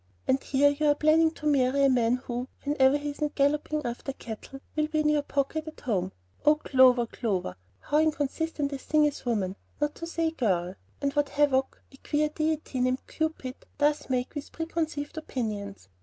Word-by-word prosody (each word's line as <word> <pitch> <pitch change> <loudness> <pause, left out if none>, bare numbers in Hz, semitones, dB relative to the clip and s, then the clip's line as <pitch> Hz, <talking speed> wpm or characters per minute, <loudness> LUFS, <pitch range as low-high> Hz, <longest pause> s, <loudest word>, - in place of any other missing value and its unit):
And 265 +1 +3
here 285 +1 +3
you 300 +1 0
are 290 - +5
planning 315 +2 +4
to 300 - -9
marry 280 -1 +3
a - - +7
man 245 -2 +3
who, 250 0 -4 0.2
whenever 280 -1 +4
he 290 0 -3
isn't 300 +1 -3
galloping 300 +1 +1
after 245 +3 -4
cattle, 240 +2 -8 0.2
will 305 0 +1
be 310 0 0
in 300 - +2
your 300 -1 +3
pocket 285 +3 -2
at 315 - -9
home! 190 -6 -1 0.3
Oh, 300 +1 +6
Clover, 255 -4 +4
Clover, 195 - -2 0.3
how 295 - +1
inconsistent 305 -1 0
a 275 - -4
thing 305 +2 +3
is 290 -3 -3
woman, 200 -5 0 0.2
not 295 0 0
to 335 - -7
say 330 -1 0
girl, 185 - 0 0.3
and 280 -1 0
what 290 -1 +1
havoc 275 -2 +1
that 270 - -18
queer 300 0 +1
deity 310 -3 -2
named 255 +1 0
Cupid 315 -5 -3 0.2
does 295 0 +1
make 250 -1 -1
with 290 -2 -6
preconceived 320 -2 -3
opinions! 210 - -5
285 Hz, 185 wpm, -28 LUFS, 255-300 Hz, 0.3 s, a